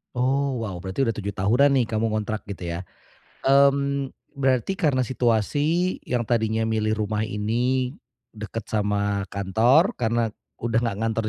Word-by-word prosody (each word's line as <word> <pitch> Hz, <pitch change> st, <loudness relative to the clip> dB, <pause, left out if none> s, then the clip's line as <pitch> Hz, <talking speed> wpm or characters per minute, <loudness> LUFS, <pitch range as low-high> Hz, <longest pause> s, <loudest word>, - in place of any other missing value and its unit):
Oh, 135 Hz, 0 st, +1 dB
wow 100 Hz, -4 st, -4 dB
berarti 95 Hz, +8 st, -1 dB
udah 115 Hz, -, 0 dB
7 100 Hz, -1 st, -3 dB
tahunan 120 Hz, +9 st, +3 dB
nih -, -, -3 dB
kamu 110 Hz, 0 st, 0 dB
ngontrak 110 Hz, 0 st, -2 dB
gitu 95 Hz, -4 st, -7 dB
ya? 85 Hz, 0 st, -3 dB, 0.7 s
Mmm, 140 Hz, 0 st, +3 dB, 0.2 s
berarti 135 Hz, +6 st, +1 dB
karena 140 Hz, -, +1 dB
situasi 145 Hz, -, +1 dB
yang 120 Hz, -2 st, -2 dB
tadinya 110 Hz, -1 st, +1 dB
milih 110 Hz, -1 st, 0 dB
rumah 105 Hz, +1 st, -1 dB
ini 120 Hz, +5 st, -1 dB, 0.4 s
dekat 110 Hz, 0 st, -6 dB
sama 100 Hz, -1 st, 0 dB
kantor 115 Hz, -, +3 dB
karena 115 Hz, 0 st, 0 dB, 0.3 s
udah 115 Hz, 0 st, 0 dB
nggak 115 Hz, -5 st, -1 dB
ngantor 115 Hz, 0 st, 0 dB
115 Hz, 145 wpm, -24 LUFS, 105-130 Hz, 0.7 s, tahunan